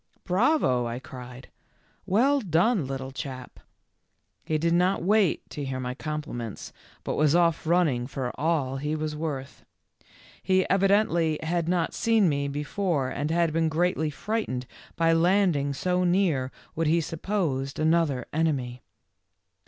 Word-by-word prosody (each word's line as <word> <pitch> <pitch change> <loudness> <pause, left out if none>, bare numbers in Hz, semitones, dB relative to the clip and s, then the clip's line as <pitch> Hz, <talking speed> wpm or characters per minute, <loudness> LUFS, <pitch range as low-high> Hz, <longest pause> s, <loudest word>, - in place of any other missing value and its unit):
" - - -38
Bravo," 185 - +2
I 115 +1 -4
cried. 125 -1 -10 0.3
" - - -38
Well 280 +4 +4
done, 180 - +2
little 135 0 -5
chap." 130 -2 -7 0.8
He 155 - 0
did 165 +2 +1
not 180 +1 +2
wait 205 -1 +2
to 145 - -5
hear 135 -1 -3
my 125 0 -3
compliments, 140 -6 -6 0.3
but - - -2
was 150 +1 +3
off 170 -2 +2
running 155 -8 +2
for 130 -2 -4
all 145 -3 0
he 150 +3 -2
was 155 -1 -3
worth. 145 -4 -5 0.8
He 185 0 +2
evidently 195 -5 +3
had 170 +1 -1
not 175 -2 0
seen 225 -4 +3
me 140 -2 0
before 150 0 -1
and 145 +3 -3
had 165 -1 +1
been 165 0 +2
greatly 160 -1 0
frightened 150 - -3 0.3
by 165 0 +3
landing 170 -4 +2
so 180 +6 0
near 175 -8 +1 0.2
what 165 0 -1
he 165 +2 +3
supposed 160 -5 -2
another 155 -5 +1
enemy. 135 -6 -1
160 Hz, 145 wpm, -26 LUFS, 135-180 Hz, 0.8 s, Well